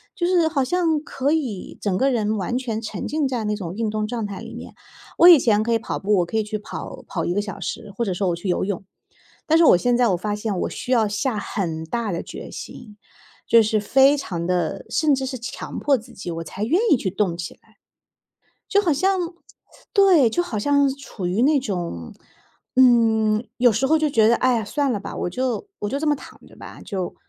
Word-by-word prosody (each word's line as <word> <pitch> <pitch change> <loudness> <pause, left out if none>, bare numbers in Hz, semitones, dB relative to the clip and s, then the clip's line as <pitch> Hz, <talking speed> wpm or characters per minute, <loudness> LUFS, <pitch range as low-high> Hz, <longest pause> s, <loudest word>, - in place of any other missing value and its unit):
就 345 - 0
是 350 -3 +3
好 295 -4 0
像 325 +1 +1
可 275 -1 -1
以 260 -12 -2
整 195 -3 0
个 270 +6 +2
人 215 -3 0
完 200 +5 -2
全 235 -4 -3
沉 215 -4 -5
浸 300 -2 0
在 245 -4 -3
那 210 0 0
种 180 -5 -6
运 225 0 -1
动 215 0 -2
状 230 -1 -3
态 200 -1 -7
里 - - -9
面。 - - -10 0.4
我 345 - +8
以 345 -4 +10
前 215 -4 +2
可 235 +1 0
以 230 - +2
跑 - - -4
步， 205 +1 +1
我 175 - +2
可 220 - -3
以 220 - +1
去 215 0 -4
跑 205 - -8
跑 - - -3
1 175 - 0
个 205 - 0
小 205 -1 -7
时， 205 - -5
或 235 - 0
者 190 - -1
说 185 +1 -1
我 170 - 0
去 175 +4 -7
游 180 - 0
泳， 195 -1 -4 0.6
但 320 - +4
是 335 - +5
我 - - +7
现 245 +6 +1
在 245 -1 +3
我 185 - +2
发 205 +3 -3
现 210 -1 -3
我 - - -1
需 250 - -6
要 230 -4 +3
下 215 +2 -1
很 165 -6 -3
大 225 +4 -2
的 170 - -3
决 - - -9
心， 215 -4 -10 0.5
就 230 -1 +6
是 215 0 +1
非 265 +7 +4
常 170 -11 -4
地， 180 -3 -1
甚 305 -3 +3
至 265 0 -3
是 260 -1 -5
强 235 - -6
迫 280 -2 +2
自 225 - -13
己， 185 - -7
我 165 0 -5
才 190 +5 -6
愿 300 - +2
意 - - +7
去 200 - -2
动 190 -2 -1
起 170 -1 -6
来。 - - -30 0.9
就 405 -1 +3
好 345 -5 +2
像 375 +6 +1 0.7
对， 370 - +5
就 350 - 0
好 260 -12 -4
像 285 +5 +3
处 230 -9 -7
于 190 +6 0
那 285 +1 +4
种 175 - -4 0.6
嗯， 225 -3 +4
有 245 0 +5
时 235 +6 +1
候 315 +4 +4
就 310 -1 +1
觉 220 -5 +4
得， 235 - +5
哎 255 -1 +2
呀， 225 - -2
算 280 +6 -1
了 210 - -1
吧， - - -7
我 - - -2
就 255 - -2
我 205 - -2
就 275 - -1
这 315 - -2
么 295 - +2
躺 - - -14
着 - - -18
吧， - - -11
就 190 -5 -4
225 Hz, 255 characters per minute, -22 LUFS, 205-275 Hz, 0.9 s, 以